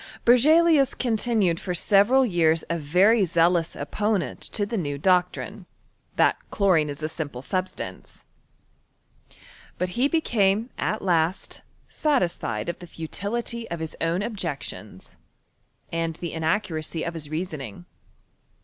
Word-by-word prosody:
Berzelius 285 +3 +5
con« 245 - -1
r - - +3
cuKMisrar. 235 +2 -1 0.2
tinued - - -10
for 180 -2 -3
several 205 +9 +4
vean 170 -8 +3 0.2
a 170 - -1
very 190 +9 +4
zealous 170 -1 +2
oppottent 210 -3 -2
ts 205 +1 -2
n 145 -9 -2
doctrine, 180 +2 0 0.5
that - - +3
chlorioe 180 -7 +3
\& - - -8
a - - +1
simple 150 -6 -6
subGtaoce. 185 +5 -5 1.5
But 180 0 -2
be 250 +3 +2
became 230 -8 +1
at 215 - -1
last 175 -1 0 0.3
satisfied 175 - -1
of 170 - -4
the 175 - -10
futility 225 +8 -5
of 170 - -4
hii 160 -1 -5
own 170 +4 0
objections, 140 - -6 0.7
aud 165 -1 -1
the 170 0 -5
inaccuracy 160 -1 -1
of 170 - -3
his 155 -3 -7
reasoning. 150 - -5
180 Hz, 130 wpm, -25 LUFS, 160-215 Hz, 1.5 s, Berzelius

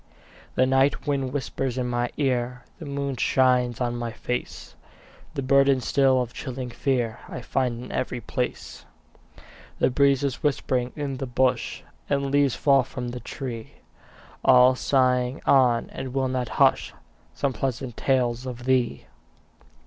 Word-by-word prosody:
The 130 - +4
night 135 +2 +2
wind 135 -3 -1
whispers 135 -2 -3
in 125 - -1
my 120 0 -1
ear, 125 -3 -1 0.2
The 160 - -8
moon 140 -1 -3
shines 125 -2 +2
on 120 -1 -1
my 120 -1 -3
face; 125 +2 -5 0.6
The 135 - -2
burden 140 0 +4
still 130 0 +3
of 120 - -10
chilling 130 -2 -6
fear 120 -3 -1
I - - -6
find 125 -1 -1
in - - -9
every 125 -1 -2
place. 125 +1 -4 0.9
The - - +2
breeze 140 +1 +3
is 140 -2 -2
whispering 130 -4 0
in 140 -3 -3
the 135 - -4
bush, 125 0 0 0.3
And 140 -1 +1
the 140 - -2
leaves 140 -2 +2
fall 140 -2 +4
from 125 -1 -6
the 125 +1 -6
tree, 120 -2 -7 0.7
All 125 +1 +7
sighing 125 -1 +1
on, 125 -4 +3
and 130 -1 -6
will 135 -1 +1
not 125 -2 -2
hush, - - +3 0.4
Some 140 -2 -1
pleasant 125 0 -3
tales 125 -2 0
of 120 -1 -7
thee. 130 -2 +1
130 Hz, 150 wpm, -25 LUFS, 125-135 Hz, 0.9 s, All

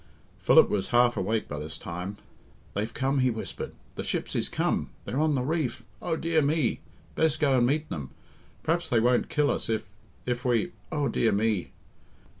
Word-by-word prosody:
Philip - - +6
was 100 -2 -1
half 120 0 +4
awake 110 +3 -1
by - - -5
this 80 +1 -5
time. 90 +4 -5 0.6
"They've 105 +3 -2
come," 135 +1 0
he 130 -1 +4
whispered. 110 -2 -5 0.2
"The - - -5
ships - - -2
is - - 0
come, - - 0 0.2
they're 130 - -2
on 155 -1 +3
the 125 - 0
reef. 140 -4 -1 0.2
Oh, 170 -2 -1
dear 165 -1 +2
me! 145 -3 +1 0.3
Best 155 -1 +2
go 140 -3 +3
and 120 - +4
meet 150 +3 0
them. 70 -4 -5 0.5
P'raps 170 +1 0
they 120 - +4
won't 120 +2 +2
kill 150 -1 +2
us - - 0
if 110 -2 -1 0.4
if 125 0 -2
we 125 +8 +1 0.2
Oh, 145 -2 0
dear 115 - +2
me!" 105 -2 +1
125 Hz, 185 wpm, -28 LUFS, 110-150 Hz, 0.6 s, Philip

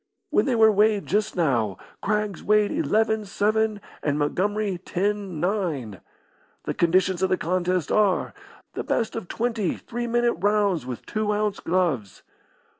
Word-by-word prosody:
When - - +3
they 255 - +2
were 220 -1 +6
weighed 210 0 +3
just 210 +2 0
now, 120 - +1 0.2
Craggs 210 -2 -1
weighed 210 0 +3
eleven 220 -8 +1
seven, 215 +1 0 0.2
and 145 -1 0
Montgomery 195 +6 0
ten 195 -1 -2
nine. 160 - -2 0.6
The - - -2
conditions 185 +1 +2
of 190 - +2
the 185 - +2
contest 180 -1 -1
are 205 -3 +2 0.4
the - - -4
best 230 - -1
of 225 -6 -5
twenty 225 -4 -1
three 240 +1 -5
minute 240 0 +2
rounds 200 -6 +1
with 125 -2 -6
two 215 -1 -1
ounce 210 -1 -1
gloves. 165 - -1
200 Hz, 145 wpm, -24 LUFS, 175-215 Hz, 0.6 s, were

